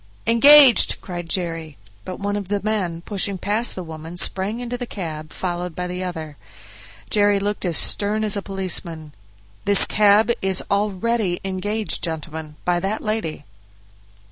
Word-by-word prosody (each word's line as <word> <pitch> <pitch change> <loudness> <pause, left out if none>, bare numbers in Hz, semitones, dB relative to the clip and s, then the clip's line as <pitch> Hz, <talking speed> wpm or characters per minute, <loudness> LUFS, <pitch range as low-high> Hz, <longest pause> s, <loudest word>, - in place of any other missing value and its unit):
"Engaged," 270 +2 +6
cried 175 -2 -7
Jerry; 165 -4 -2 0.3
but 185 - -5
one 205 0 -2
of 200 -2 -4
the 205 +1 -1
men, 190 -6 -2
pushing 200 +1 -1
past 210 +5 0
the 185 - -5
woman, 160 +1 -9
sprang 195 +5 +2
into 245 0 -4
the 245 0 -5
cab, 155 -7 -6
followed 175 -2 -4
by 180 - -3
the 180 +1 -4
other. 160 -5 -6 0.7
Jerry 205 -1 +3
looked 205 0 -2
as 170 -3 +1
stern 210 +1 0
as 215 -1 0
a 200 - -2
policeman. 175 -5 -2 0.5
"This 200 0 +6
cab 210 +2 +4
is 190 -1 0
already 205 -1 0
engaged, 205 +3 -3
gentlemen, 160 -2 -5
by 175 -1 +1
that 195 +4 -3
lady." 215 -9 -3
190 Hz, 150 wpm, -21 LUFS, 170-210 Hz, 0.7 s, Engaged